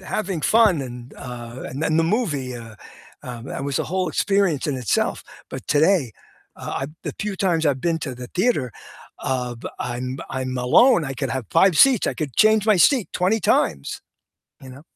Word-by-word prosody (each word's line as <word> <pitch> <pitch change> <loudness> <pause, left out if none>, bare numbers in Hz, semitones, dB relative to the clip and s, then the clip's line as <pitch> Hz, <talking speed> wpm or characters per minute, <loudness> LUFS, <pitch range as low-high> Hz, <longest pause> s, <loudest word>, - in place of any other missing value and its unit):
having 190 -2 -3
fun 215 -4 +4
and, 125 -1 -8
uh, 120 0 -8
and 140 +4 -6
then 160 -1 +1
the 165 - +3
movie, 160 - -1
uh, 115 -2 -10 0.5
um, 120 -2 -8
that 135 - -5
was 140 -2 -1
a - - -1
whole 185 +1 -1
experience 195 -3 +1
in 145 -3 -1
itself. 125 -7 -1 0.3
But, - - -8
today, 150 - +2 0.4
uh, - - -5
I - - -2 0.2
the - - -5
few 210 -1 -3
times 170 -4 +1
I've 135 -3 +1
been 165 +2 0
to 135 -5 -5
the 125 0 -9
theater, 180 - +1 0.5
uh, 125 -2 -2 0.2
I'm 125 +2 -4
I'm 130 -1 -3
alone. 170 - +5
I 135 -1 -4
could 135 0 -3
have 130 -4 -3
5 175 0 +4
seats. 265 -6 +5
I - - -1
could 150 -7 -5
change 215 -1 +4
my 215 -2 +5
seat 240 - +4
20 190 +5 +1
times, 70 - 0 0.6
you 130 - -11
know? 130 +3 -12
145 Hz, 190 wpm, -22 LUFS, 125-190 Hz, 0.6 s, alone